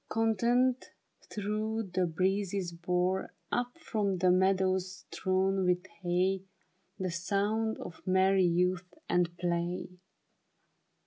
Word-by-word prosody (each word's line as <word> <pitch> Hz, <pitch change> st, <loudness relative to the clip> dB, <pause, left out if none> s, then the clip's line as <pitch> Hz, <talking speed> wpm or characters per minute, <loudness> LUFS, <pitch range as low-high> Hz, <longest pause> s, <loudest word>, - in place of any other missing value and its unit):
Contented, 235 Hz, +3 st, +2 dB, 0.5 s
though 215 Hz, +2 st, -1 dB
the 185 Hz, -2 st, 0 dB
breezes 190 Hz, +2 st, 0 dB
bore 180 Hz, +2 st, -1 dB, 0.2 s
Up 245 Hz, +4 st, -1 dB
from 210 Hz, -, -1 dB
the 180 Hz, 0 st, +4 dB
meadows 185 Hz, 0 st, +1 dB
strown 190 Hz, 0 st, +1 dB
with 180 Hz, 0 st, +1 dB, 0.2 s
hay, 185 Hz, +2 st, +1 dB, 0.6 s
The 185 Hz, -2 st, -2 dB
sound 205 Hz, +5 st, 0 dB
of 165 Hz, -, -9 dB
merry 190 Hz, 0 st, +4 dB
youth 180 Hz, +1 st, +1 dB, 0.2 s
at 175 Hz, -1 st, +1 dB
play. 175 Hz, 0 st, -1 dB
185 Hz, 105 wpm, -31 LUFS, 180-205 Hz, 0.6 s, the